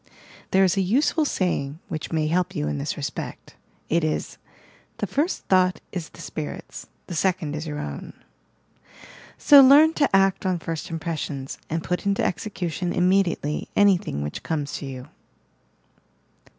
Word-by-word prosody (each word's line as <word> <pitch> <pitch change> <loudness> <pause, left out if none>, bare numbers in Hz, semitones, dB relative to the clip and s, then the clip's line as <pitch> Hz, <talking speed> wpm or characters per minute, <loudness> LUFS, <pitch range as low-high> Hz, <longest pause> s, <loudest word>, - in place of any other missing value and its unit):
There 190 0 +4
is 185 0 +2
a - - +3
useful 280 - +2
saying 155 - -1
which 155 - -5
may 160 -2 +1
help 175 +3 0
you 75 - -1
in 75 -1 -2
this - - -3
respect. - - -6 0.3
It 170 +1 +1
is; 155 -1 -2 0.6
"The - - -1
first 310 +6 -1
thought 185 -1 +3
is 175 -3 -5
the 170 - -13
spirit's, 155 -1 -7 0.2
the - - -7
second 175 -3 0
is 155 +1 -5
your 150 -1 -4
own." 70 - -6 1.2
So 285 -1 +8
learn 290 +4 +7
to 290 -3 +2
act 195 -1 +3
on 185 -2 0
first 165 -1 -5
impressions, 155 -4 -4
and 165 +1 -2
put 180 +3 -2
into 200 0 +1
execution 180 -3 -3
immediately 180 -5 +1
anything 185 - +3
which 75 - -5
comes 150 -3 -3
to 140 - -7
you. 130 0 -8
175 Hz, 150 wpm, -24 LUFS, 155-195 Hz, 1.2 s, So